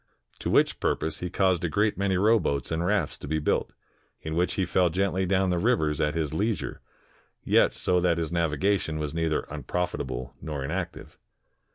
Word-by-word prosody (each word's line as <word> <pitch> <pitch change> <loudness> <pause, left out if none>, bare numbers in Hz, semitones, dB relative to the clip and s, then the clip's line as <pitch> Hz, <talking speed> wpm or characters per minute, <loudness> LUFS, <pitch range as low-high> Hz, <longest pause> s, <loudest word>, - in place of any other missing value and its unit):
To - - -3
which - - +3
purpose 80 0 -1
he 90 - -3
caused 95 -2 +1
a 90 - 0
great 105 +6 +1
many 100 -1 +1
rowboats 100 - +2
and 80 +1 0
rafts 100 +3 0
to - - -8
be 80 +2 0
built, 75 - 0 0.5
in 80 - -4
which 90 +2 +1
he 95 - +1
fell 90 0 +2
gently 95 +1 0
down 95 0 +2
the 90 - +1
rivers 80 - +1
at 75 +1 +1
his 80 -3 -1
leisure, 95 - -2 0.6
yet - - +4
so 90 0 +1
that 85 -1 +2
his 80 -1 -2
navigation 85 +1 0
was 75 -1 -3
neither 80 -1 0
unprofit 90 -1 -3
able 60 +1 -5
nor 75 -4 -4
inactive. 85 +3 -5
85 Hz, 185 wpm, -27 LUFS, 80-95 Hz, 0.6 s, yet